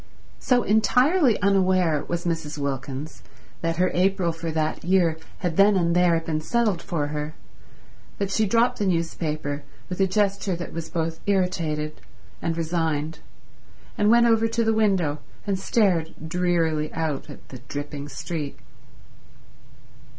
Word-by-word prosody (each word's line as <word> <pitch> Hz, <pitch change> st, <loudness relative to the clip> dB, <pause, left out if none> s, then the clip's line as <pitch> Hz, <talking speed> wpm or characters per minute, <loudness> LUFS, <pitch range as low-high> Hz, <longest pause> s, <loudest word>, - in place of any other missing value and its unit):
So 245 Hz, -2 st, +2 dB
entirely 250 Hz, -, +3 dB
unaware 185 Hz, -6 st, +3 dB
was 175 Hz, 0 st, -3 dB
Mrs. 160 Hz, -3 st, -2 dB
Wilkins 140 Hz, +1 st, -4 dB, 0.4 s
that 165 Hz, 0 st, 0 dB
her 180 Hz, +2 st, +2 dB
April 185 Hz, -1 st, +2 dB
for 165 Hz, 0 st, -5 dB
that 155 Hz, -1 st, -1 dB
year 170 Hz, -3 st, +2 dB, 0.2 s
had 175 Hz, -3 st, -2 dB
then 200 Hz, +1 st, +6 dB
and 170 Hz, -1 st, +2 dB
there 175 Hz, -2 st, +4 dB
been 160 Hz, -1 st, -3 dB
settled 215 Hz, -1 st, +1 dB
for 150 Hz, -4 st, -2 dB
her 150 Hz, +1 st, -4 dB, 0.8 s
that 200 Hz, -1 st, -2 dB
she 215 Hz, +1 st, +2 dB
dropped 230 Hz, +4 st, +2 dB
the 205 Hz, -, +1 dB
newspaper 155 Hz, -4 st, -1 dB, 0.3 s
with 180 Hz, -, -4 dB
a 190 Hz, -, +4 dB
gesture 200 Hz, -1 st, 0 dB
that 175 Hz, 0 st, -7 dB
was 160 Hz, -1 st, -5 dB
both 165 Hz, -1 st, -2 dB
irritated 165 Hz, -6 st, 0 dB, 0.4 s
and 165 Hz, 0 st, -1 dB
resigned, 160 Hz, -2 st, -1 dB, 0.8 s
and 210 Hz, 0 st, +2 dB
went 235 Hz, +1 st, +6 dB
over 225 Hz, -1 st, +4 dB
to 230 Hz, +1 st, 0 dB
the 225 Hz, 0 st, +2 dB
window 190 Hz, -9 st, +1 dB, 0.3 s
and 195 Hz, -2 st, -1 dB
stared 185 Hz, -7 st, +1 dB
drearily 165 Hz, -3 st, 0 dB
out 155 Hz, -3 st, -2 dB
at 145 Hz, -, -12 dB
the 130 Hz, -, -9 dB
dripping 145 Hz, +1 st, -5 dB
street. 150 Hz, -2 st, -5 dB
170 Hz, 145 wpm, -24 LUFS, 155-195 Hz, 0.8 s, then